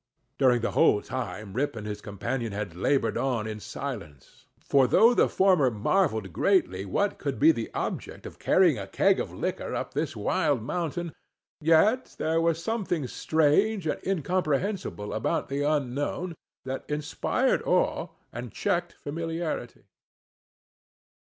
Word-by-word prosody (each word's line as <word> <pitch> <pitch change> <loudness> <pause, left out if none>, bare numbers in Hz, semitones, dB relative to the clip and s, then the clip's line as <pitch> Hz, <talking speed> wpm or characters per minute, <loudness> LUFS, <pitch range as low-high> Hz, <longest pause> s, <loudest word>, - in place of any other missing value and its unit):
During 125 -3 +4
the - - -1
whole 105 - +4
time 105 -5 -5
Rip 140 +3 -1
and 110 -2 -6
his 105 0 -5
companion 110 +3 -3
had 100 -4 -4
labored 135 +9 +1
on 125 -5 0
in 110 -1 -5
silence; 105 - -8
for 135 -2 +3
though 230 - +6
the - - +3
former 185 -9 +4
marvelled 110 - 0
greatly 100 - +2
what 200 - 0
could 140 -3 -3
be 155 +3 +6
the 115 -7 -4
object - - -4
of - - -10
carrying 175 - +4
a 100 - -6
keg - - +3
of - - -3
liquor - - -3
up - - -4
this - - -2
wild 145 -8 0
mountain, 170 +3 -3 0.5
yet 165 +11 +3
there 165 +1 +1
was 165 0 +1
something 190 - -1
strange 160 - +2
and 155 - -2
incomprehensible 180 - -1
about 110 - -1
the 140 +1 -1
unknown, 145 +4 -1 0.3
that 130 0 -4
inspired 150 0 0
awe - - +1 0.3
and 120 -1 -6
checked 175 0 -1
familiarity. 165 +2 -4
145 Hz, 140 wpm, -27 LUFS, 115-170 Hz, 0.5 s, though